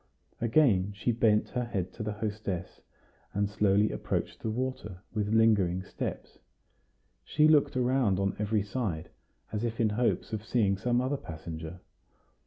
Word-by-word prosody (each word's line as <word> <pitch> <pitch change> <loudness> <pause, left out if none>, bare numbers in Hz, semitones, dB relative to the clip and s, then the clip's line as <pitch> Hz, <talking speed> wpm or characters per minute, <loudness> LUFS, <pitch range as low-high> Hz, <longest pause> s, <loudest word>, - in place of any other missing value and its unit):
Again 110 -6 +3
she 115 +4 0
bent 110 -2 +3
her 125 - -1
head 95 -6 -3
to - - -8
the 105 -1 -2
hostess, 105 -4 -4 0.5
and 100 0 +2
slowly 105 0 +2
approached - - -3
the 110 - -3
water, 110 -6 -4
with 105 -1 -1
lingering 100 -5 +3
steps. - - -6 0.8
She 150 0 +3
looked 150 -4 +4
around 125 -6 +2
on 100 0 0
every 105 0 +1
side, 100 -7 -3 0.4
as 105 +1 -2
if 115 -1 -2
in 110 -2 +3
hopes 115 +1 0
of 105 -1 -3
seeing 110 -4 +2
some 120 +5 +1
other 135 +3 0
passenger. 80 -1 -7
105 Hz, 150 wpm, -30 LUFS, 95-120 Hz, 0.8 s, looked